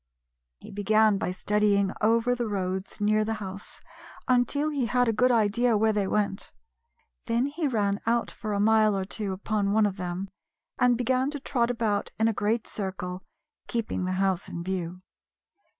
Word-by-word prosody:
He - - -11
began 210 0 +3
by 180 - -1
studying 200 0 +2
over 230 +3 +3
the 240 -2 -2
roads 190 -1 -3
near 215 +1 +2
the 220 +1 -2
house 195 -1 -6 0.5
until 260 +4 +2
he 275 -5 -1
had 245 +1 +2
a 225 - +2
good 250 +4 +3
idea 230 0 +3
where 220 +1 +2
they 205 -2 0
went. 200 -1 -1 0.8
Then 235 +2 +1
he 300 +2 -2
ran 205 -5 0
out 235 0 +1
for 215 -2 -6
a 200 - 0
mile 215 -1 +4
or 190 - -2
two 205 0 -3
upon 200 +1 -1
one 220 0 +4
of 200 -1 -2
them, 180 +1 -4 0.5
and 245 -1 +4
began 255 +2 +1
to 290 -1 -5
trot 245 -3 0
about 225 -4 -1
in 220 - +3
a 225 - +1
great 215 +3 0
circle, 185 -2 -5 0.5
keeping 230 -5 -2
the 185 - -1
house 190 -1 0
in 170 - -5
view. 180 -1 -4
215 Hz, 175 wpm, -27 LUFS, 195-235 Hz, 0.8 s, mile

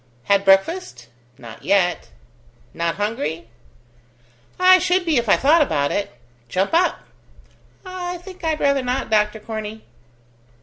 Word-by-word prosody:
"Had 200 +6 +2
breakfast?" 195 - +1 0.3
"Not 115 -2 -12
yet." 185 -2 +1 0.6
"Not 170 0 -2
hungry?" 205 - -3 1.1
"I 370 0 +7
should 360 +2 +1
be 320 -5 +1
if 235 -2 0
I - - +6
thought 310 +5 +4
about 145 - 0
it." 200 -11 -3 0.4
"Jump 190 - -1
up." 350 +2 +2 0.8
"I 360 -1 -5
think 365 +1 -13
I'd 315 -2 -1
rather 280 -1 +2
not, 255 -1 -3
Doctor 210 0 +1
Corney." 220 0 -7
220 Hz, 130 wpm, -21 LUFS, -, 1.1 s, I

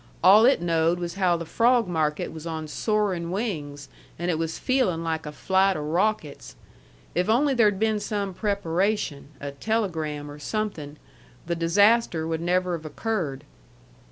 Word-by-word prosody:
All 205 +4 +8
it 265 -9 +3
knowed 165 0 +2
was 175 -1 -4
how 185 -2 +2
the 170 - -6
frawg 235 +5 +3
market 155 -3 -1
was 160 0 -8
on 160 -1 -4
soarin' 195 -2 -1
wings, 155 -9 -4 0.3
and 175 +2 -1
it 160 - -1
was 160 -1 -2
feelin' 245 -11 0
like 160 -1 -3
a - - -5
flight 190 +4 +2
o' - - -4
rawckets. 175 0 -1 0.6
If 180 +3 0
only 270 +5 +3
there'd 210 -5 +3
been 220 0 +1
some 205 -2 -3
preparation, 195 -5 -1
a 140 0 -5
telegram 155 -5 -2
or 145 - -11
something, 155 -5 -4 0.5
the 170 +1 -1
disaster 185 +1 +3
would 160 0 -2
never 180 +1 +1
have 160 -1 -9
occurred. 155 -5 -3
175 Hz, 155 wpm, -25 LUFS, 160-210 Hz, 0.6 s, All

